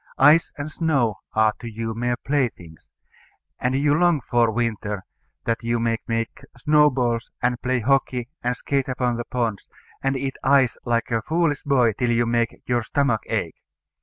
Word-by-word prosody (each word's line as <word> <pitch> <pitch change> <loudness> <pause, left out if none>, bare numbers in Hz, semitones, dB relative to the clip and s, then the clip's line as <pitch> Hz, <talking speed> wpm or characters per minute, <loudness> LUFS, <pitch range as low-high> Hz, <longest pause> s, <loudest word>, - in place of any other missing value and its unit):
Ice 150 +4 +5
and 150 +1 -5
snow 135 - 0 0.2
are 110 0 +4
to 120 - -7
you 115 0 -4
mere 120 +2 -1
playthings; 115 - -2 0.7
and 125 +1 0
you 145 +2 +3
long 170 0 +3
for 120 -3 +2
winter, 110 -3 -2 0.4
that 115 0 0
you 115 0 0
may 115 0 0
make 115 +2 -2 0.2
snowballs 125 -4 +2
and 120 0 0
play 130 -1 0
hockey 130 -1 +1 0.2
and 125 0 0
skate 140 -2 -1
upon 125 -2 0
the 120 - -4
ponds, 115 -5 -3 0.3
and 135 0 0
eat 135 0 -3
ice 135 -3 +4
like 120 0 0
a 115 -1 +1
foolish 160 +2 0
boy 125 -6 +3
till 120 +4 -1
you 120 0 +2
make 115 0 -1
your 120 -1 +1
stomach 120 -2 0
ache. - - -2
120 Hz, 165 wpm, -23 LUFS, 115-135 Hz, 0.7 s, Ice